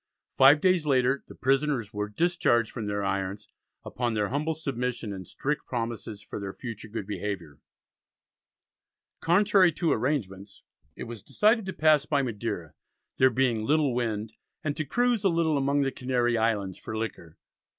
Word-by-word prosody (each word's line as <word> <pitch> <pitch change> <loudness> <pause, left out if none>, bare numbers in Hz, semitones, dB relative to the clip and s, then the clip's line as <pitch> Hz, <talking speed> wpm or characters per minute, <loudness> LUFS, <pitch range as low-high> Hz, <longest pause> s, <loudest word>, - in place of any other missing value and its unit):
Five 140 +3 +7
days 180 -4 +3
later 130 0 +2
the - - -12
prisoners 135 -4 0
were 105 0 -3
"discharged 120 -4 +1
from 110 -4 -5
their 100 0 -2
irons," 100 +1 -2 0.4
upon 120 -2 -2
their 105 -1 0
humble 150 +4 -1
submission 125 -7 -3
and 95 -2 -8
strict 150 +1 -3
promises 115 -3 -4
for - - -7
their 100 -1 -6
future 115 -3 -7
good 110 -2 -5
behaviour. 95 -7 -5 1.6
Contrary 190 +1 +4
to 170 -3 0
arrangements 105 -7 -2 0.3
it - - -6
was 115 -3 -8
decided 215 - +2
to 190 - -3
pass 155 -2 +3
by 145 -2 +2
Madeira, 105 - -4 0.4
there 130 - +6
being 120 -3 +1
"little 145 +1 +2
wind," 110 -3 -2 0.3
and 145 -3 -1
to 155 - -2
"cruise 240 - +1
a 195 - +4
little 165 -2 +1
among 140 +1 +1
the 135 - 0
Canary 125 -2 0
Islands 105 -5 0
for 110 - -6
liquor." 100 -7 -6
125 Hz, 160 wpm, -27 LUFS, 105-150 Hz, 1.6 s, Five